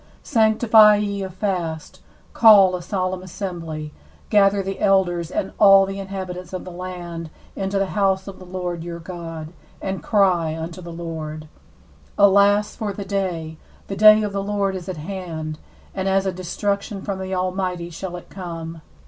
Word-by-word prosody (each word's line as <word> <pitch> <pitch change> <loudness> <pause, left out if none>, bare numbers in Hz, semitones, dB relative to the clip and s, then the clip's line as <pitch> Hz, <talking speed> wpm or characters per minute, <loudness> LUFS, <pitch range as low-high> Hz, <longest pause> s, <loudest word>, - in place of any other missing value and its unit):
14Sanctify 220 -2 +5
ye 200 -1 -2
a 190 - -4
fast, 180 -5 -4 0.3
call 200 -5 +7
a 180 - -5
solemn 185 0 -2
assembly, 165 -5 -6 0.4
gather 200 -1 +4
the 195 0 -5
elders 175 -4 +2
and 190 - -2
all 195 -1 +8
the 195 0 -5
inhabitants 185 -2 -6
of 185 - -5
the 180 - -8
land 175 -2 -7 0.3
into 195 0 -2
the 195 - +2
house 195 -2 +1
of 195 - -9
the - - -11
Lord 180 -2 -4
your 170 0 -6
God, 165 -2 -8 0.3
and 190 0 -4
cry 180 -6 +2
unto 165 +3 -6
the 170 -1 -8
Lord, 160 -2 -6 0.7
15Alas 200 +1 +4
for 210 -2 -3
the 200 0 -6
day! 180 -5 -3 0.3
for - - -29
the 195 - -3
day 215 +2 +7
of 205 -1 -3
the 200 - -1
Lord 200 -1 -1
is 185 0 -6
at 185 - -4
hand, 160 -3 -5 0.3
and 190 0 -2
as 195 0 +2
a 190 - 0
destruction 200 +3 -3
from 195 -2 -3
the 190 0 -3
Almighty 180 -1 -2
shall 175 +2 -6
it 175 - -11
come. 165 -3 -7
185 Hz, 170 wpm, -22 LUFS, 170-195 Hz, 0.7 s, all